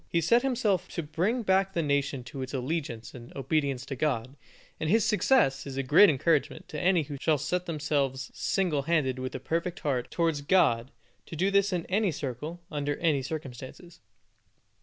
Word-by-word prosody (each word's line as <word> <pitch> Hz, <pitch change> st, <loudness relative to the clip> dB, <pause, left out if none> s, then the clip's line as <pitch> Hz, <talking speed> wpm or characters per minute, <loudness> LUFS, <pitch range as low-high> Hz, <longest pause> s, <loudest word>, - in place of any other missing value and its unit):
He 170 Hz, -, +2 dB
set 205 Hz, +9 st, +4 dB
himself 230 Hz, -9 st, 0 dB
to 170 Hz, -, -2 dB
bring 190 Hz, +11 st, -1 dB
back 195 Hz, -1 st, +2 dB
the 170 Hz, -, 0 dB
nation 140 Hz, -2 st, 0 dB
to 135 Hz, +2 st, -8 dB
its 130 Hz, +1 st, -5 dB
allegiance 130 Hz, -4 st, -3 dB
and 120 Hz, -1 st, -11 dB
obedience 135 Hz, -1 st, -1 dB
to 140 Hz, -, -5 dB
God; 130 Hz, -2 st, -1 dB, 0.4 s
and 155 Hz, -, -1 dB
his 220 Hz, +3 st, +4 dB
success 210 Hz, -, +2 dB
is 135 Hz, -1 st, -6 dB
a 135 Hz, -, 0 dB
great 160 Hz, +10 st, +7 dB
encouragement 150 Hz, +1 st, 0 dB
to 150 Hz, -, -5 dB
any 180 Hz, -2 st, +3 dB
who 145 Hz, 0 st, -7 dB
shall 155 Hz, -2 st, +3 dB
set 180 Hz, +6 st, -2 dB
themselves, 145 Hz, -4 st, -1 dB
single 175 Hz, -7 st, 0 dB
handed 140 Hz, -4 st, +1 dB
and -, -, -6 dB
with 130 Hz, -, -4 dB
a -, -, -3 dB
perfect 165 Hz, +6 st, -3 dB
heart, 130 Hz, -4 st, -1 dB
towards 165 Hz, -4 st, 0 dB
God, 145 Hz, -8 st, +3 dB, 0.4 s
to -, -, -7 dB
do 190 Hz, +5 st, +1 dB
this 200 Hz, 0 st, +3 dB
in 175 Hz, -2 st, -2 dB
any 200 Hz, 0 st, +1 dB
circle, 150 Hz, +4 st, -5 dB
under 145 Hz, -1 st, -1 dB
any 155 Hz, -5 st, +1 dB
circumstances. 135 Hz, +3 st, -8 dB
155 Hz, 185 wpm, -28 LUFS, 135-180 Hz, 0.4 s, great